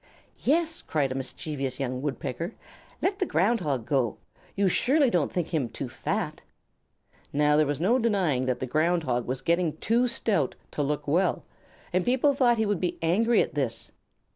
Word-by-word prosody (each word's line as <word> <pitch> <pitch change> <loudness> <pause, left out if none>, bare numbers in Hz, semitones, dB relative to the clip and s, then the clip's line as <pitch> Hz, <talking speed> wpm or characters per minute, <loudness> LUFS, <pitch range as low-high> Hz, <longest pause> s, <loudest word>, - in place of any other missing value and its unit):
"Yes," 325 +4 +1
cried 140 -4 -1
a - - -3
mischievous 135 0 -3
young 130 -1 -2
Woodpecker; 145 - -4 0.5
"let 390 +1 +1
the 380 - +2
Ground 210 +8 +2
Hog 140 - -2
go. 130 -5 0 0.4
You 200 0 +2
surely 265 - +3
don't 170 -5 +1
think 175 -3 -2
him 145 -8 -1
too - - -5
fat?" - - -3 0.9
Now 150 +1 +3
there 150 -1 +4
was 145 -1 -1
no 225 +10 +3
denying 185 - +1
that 125 -1 0
the - - -2
Ground 165 +6 +1
Hog 125 -4 -1
was 130 +1 -3
getting 170 -1 +1
too 235 +6 +2
stout 205 - 0 0.2
to - - -2
look 145 +1 -2
well, 175 +5 +1 0.5
and 185 0 +2
people 260 +5 +3
thought 245 -3 +3
he 220 - +1
would 205 -4 -1
be 180 - -1
angry 220 +8 +3
at - - -7
this. 130 -6 -2
165 Hz, 180 wpm, -27 LUFS, 135-220 Hz, 0.9 s, there